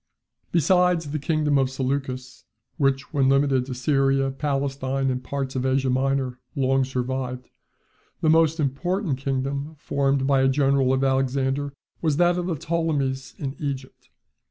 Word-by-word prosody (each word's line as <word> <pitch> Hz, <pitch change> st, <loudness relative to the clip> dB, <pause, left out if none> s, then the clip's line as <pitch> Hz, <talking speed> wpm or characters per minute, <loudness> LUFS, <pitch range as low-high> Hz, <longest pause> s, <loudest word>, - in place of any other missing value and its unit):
Besides 175 Hz, -1 st, +3 dB
the 155 Hz, -, -2 dB
kingdom 150 Hz, -1 st, +1 dB
of 130 Hz, -1 st, +2 dB
Seleucus, 130 Hz, -1 st, -3 dB, 0.3 s
which, 135 Hz, 0 st, 0 dB
when 135 Hz, -3 st, +3 dB
limited 135 Hz, -2 st, +2 dB
to 130 Hz, -, -4 dB
Syria, 135 Hz, 0 st, +2 dB
Palestine, 135 Hz, -1 st, -1 dB
and 125 Hz, 0 st, -3 dB
parts 135 Hz, 0 st, -4 dB
of 130 Hz, -, -1 dB
Asia 130 Hz, 0 st, +1 dB
Minor, 130 Hz, -1 st, 0 dB, 0.2 s
long 135 Hz, 0 st, +2 dB
survived; 130 Hz, -1 st, -3 dB, 0.7 s
the -, -, 0 dB
most 160 Hz, 0 st, +4 dB
important 155 Hz, +2 st, -1 dB
kingdom 140 Hz, +3 st, -2 dB
formed 135 Hz, -2 st, 0 dB
by 135 Hz, -1 st, +3 dB
a 135 Hz, -, +4 dB
general 135 Hz, -1 st, +2 dB
of 130 Hz, 0 st, +1 dB
Alexander 135 Hz, +1 st, 0 dB, 0.3 s
was 155 Hz, -4 st, +1 dB
that 175 Hz, +1 st, +3 dB
of 175 Hz, -, -3 dB
the 175 Hz, -, -1 dB
Ptolemies 140 Hz, -5 st, -2 dB
in 135 Hz, -1 st, -4 dB
Egypt. 135 Hz, -3 st, -6 dB
135 Hz, 145 wpm, -24 LUFS, 130-145 Hz, 0.7 s, most